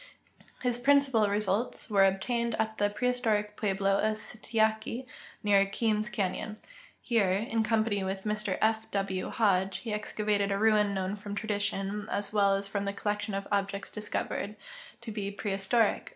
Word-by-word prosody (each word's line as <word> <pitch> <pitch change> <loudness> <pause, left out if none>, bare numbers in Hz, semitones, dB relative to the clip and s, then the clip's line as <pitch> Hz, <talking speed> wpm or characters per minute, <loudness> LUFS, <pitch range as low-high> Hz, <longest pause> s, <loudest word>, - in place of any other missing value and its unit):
His 245 -1 +1
principal 270 -4 +4
results 205 +3 0
AA^ere 195 -1 +6
obtained 235 +4 -1
at 220 0 -1
the 205 0 +3
preliistoric 215 -2 0
pueblo 195 -1 +1
of 215 0 +1
Sikyatki, 220 +2 -1 0.4
near 200 -1 +5
Kearns 215 +1 0
canyon. 210 0 -2 0.5
Here, 225 -6 +2
in 220 +4 0
com])an}' 220 -2 +1
Avith 190 0 -3
Mr 210 -2 -1
F. 220 0 +1
^\^ 195 -2 -2
Hodge, 195 -4 +2
he 225 -3 -5
excavated 210 -1 0
a 195 - +1
ruin 210 -1 +3
known 190 +1 -1
from 205 0 -7
tradition, 205 -1 -2
as 200 0 -2
Avell 200 -2 +3
as 195 0 -5
from 200 0 -2
the 200 - -2
collection 205 0 -2
of 195 0 -3
objects 200 0 -1
discovered, 210 0 -3 0.5
to 235 -1 -6
be 205 -2 -3
prehistoric. 200 +2 0
210 Hz, 150 wpm, -30 LUFS, 200-220 Hz, 0.5 s, AA^ere